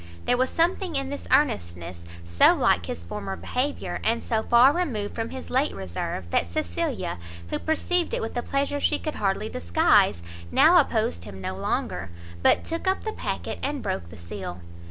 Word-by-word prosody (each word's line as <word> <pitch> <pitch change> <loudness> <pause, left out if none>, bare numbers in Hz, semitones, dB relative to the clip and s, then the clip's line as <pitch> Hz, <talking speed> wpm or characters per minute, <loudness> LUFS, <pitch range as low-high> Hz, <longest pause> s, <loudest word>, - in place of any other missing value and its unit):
There - - +3
was 255 +1 +1
something 345 0 +1
in 275 0 -1
this 285 - -6
earnestness 85 - 0 0.2
so 85 0 +5
like - - +2
his 85 - -5
former 95 +2 -5
behaviour, 250 - -2
and 230 +1 +1
so 220 -2 0
far 240 +5 +6
removed 255 - -2
from 225 0 -3
his 260 - -8
late 265 +4 +1
reserve, 95 -1 -4
that 85 - +2
Cecilia, 85 +1 -2 0.3
who - - 0
perceived 340 +2 0
it - - -1
with 225 - -4
a 240 - 0
pleasure 280 +2 -1
she 295 - +2
could 310 0 -4
hardly 200 +1 0
disguise, 85 - +3 0.3
now - - +7
opposed 85 0 0
him 95 -2 -9
no 95 0 -4
longer, 95 -1 -2 0.3
but - - +4
took 330 +3 -4
up 380 - +1
the 435 - -3
packet, - - -4
and 285 0 -2
broke 85 -3 -3
the 75 - -11
seal. 90 +1 -7
220 Hz, 180 wpm, -26 LUFS, -, 0.3 s, now